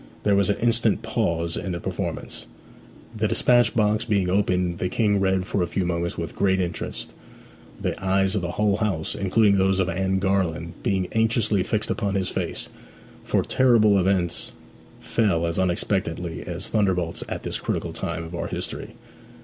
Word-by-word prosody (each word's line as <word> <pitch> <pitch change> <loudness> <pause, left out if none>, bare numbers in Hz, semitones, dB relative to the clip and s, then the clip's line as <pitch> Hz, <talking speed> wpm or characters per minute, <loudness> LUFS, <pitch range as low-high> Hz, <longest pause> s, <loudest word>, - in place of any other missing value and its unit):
There 100 -1 +3
was 100 -2 +3
an 100 - +1
instant 120 0 +2
pause 85 0 -1
in 95 - -3
the 85 - -3
performance. - - -5 0.7
The - - +1
despatch 120 -1 +3
box 105 -1 +2
being 100 -5 +1
opened 90 -3 +1
the 90 - -1
King 105 -2 +2
read 95 -1 +1
for 100 - -1
a 90 - +1
few 90 +2 -1
moments 85 0 -2
with 85 - -5
great 95 -1 +2
interest, 90 -2 -4 0.7
the - - -3
eyes 95 0 +2
of 105 - 0
the 85 0 -3
whole 105 -1 +2
house, 100 -8 -1
including 100 +1 +3
those 95 0 +2
of 95 -1 +1
Anne 95 0 0
Garland, 90 -4 0
being 95 -2 0
anxiously 110 -2 +2
fixed 110 +3 -1
upon 100 -4 -1
his 95 -1 0
face; - - -4 0.6
for - - +1
terrible 110 -6 +4
events 90 -2 0 0.5
fell 95 -8 +1
as 85 +2 -1
unexpectedly 90 -2 -1
as 90 +1 -5
thunderbolts 90 -6 0
at - - -4
this - - -3
critical - - -3
time 85 0 -4
of 80 +1 -9
our 85 - -3
history. - - -5
95 Hz, 170 wpm, -24 LUFS, 85-105 Hz, 0.7 s, terrible